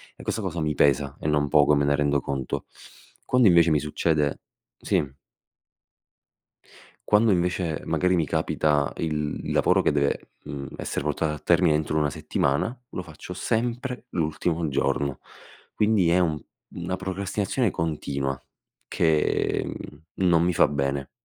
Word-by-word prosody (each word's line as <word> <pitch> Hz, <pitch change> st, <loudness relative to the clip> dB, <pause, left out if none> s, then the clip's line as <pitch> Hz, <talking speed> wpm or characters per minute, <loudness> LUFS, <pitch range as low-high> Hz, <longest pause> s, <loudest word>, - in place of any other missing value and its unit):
E -, -, -13 dB
questa 110 Hz, -, -2 dB
cosa 85 Hz, -3 st, -3 dB
mi 75 Hz, -1 st, -1 dB
pesa 70 Hz, 0 st, +2 dB
e -, -, -4 dB
non 75 Hz, -1 st, +2 dB
poco 75 Hz, 0 st, +5 dB
me 70 Hz, 0 st, +2 dB
ne 70 Hz, 0 st, +3 dB
rendo 70 Hz, -1 st, +1 dB
conto. 65 Hz, -2 st, -3 dB, 0.6 s
Quando 125 Hz, -3 st, +4 dB
invece 85 Hz, -2 st, +5 dB
mi 75 Hz, -, +3 dB
succede 75 Hz, -1 st, 0 dB, 0.4 s
sì. -, -, +1 dB, 2.1 s
Quando 105 Hz, +1 st, +5 dB
invece, 90 Hz, -3 st, 0 dB
magari 90 Hz, 0 st, +1 dB
mi 80 Hz, -, +1 dB
capita 75 Hz, 0 st, +1 dB
il 75 Hz, -2 st, -2 dB
il -, -, -2 dB
lavoro -, -, +3 dB
che -, -, +1 dB
deve, 70 Hz, -1 st, -1 dB
mhmm, 70 Hz, -1 st, -6 dB
essere -, -, -4 dB
portato 75 Hz, +1 st, 0 dB
a -, -, -10 dB
termine 75 Hz, -, +3 dB
entro 75 Hz, 0 st, -1 dB
una 75 Hz, -1 st, +2 dB
settimana, 70 Hz, -, -1 dB
lo -, -, -5 dB
faccio 85 Hz, +1 st, -9 dB
sempre 120 Hz, +5 st, -2 dB
l'ultimo 80 Hz, -1 st, -1 dB
giorno. 70 Hz, 0 st, -1 dB, 0.5 s
Quindi, 105 Hz, -5 st, +2 dB
è 85 Hz, +2 st, +4 dB
un 80 Hz, -4 st, +1 dB, 0.3 s
una 95 Hz, -, -4 dB
procrastinazione 100 Hz, +4 st, -1 dB
continua 70 Hz, -4 st, -2 dB, 0.5 s
che, 80 Hz, -2 st, +1 dB
mhmm, 75 Hz, -, -8 dB, 0.3 s
non 85 Hz, -1 st, +4 dB
mi 90 Hz, -, +2 dB
fa -, -, +5 dB
bene, 70 Hz, -1 st, -2 dB
80 Hz, 145 wpm, -25 LUFS, 70-90 Hz, 2.1 s, poco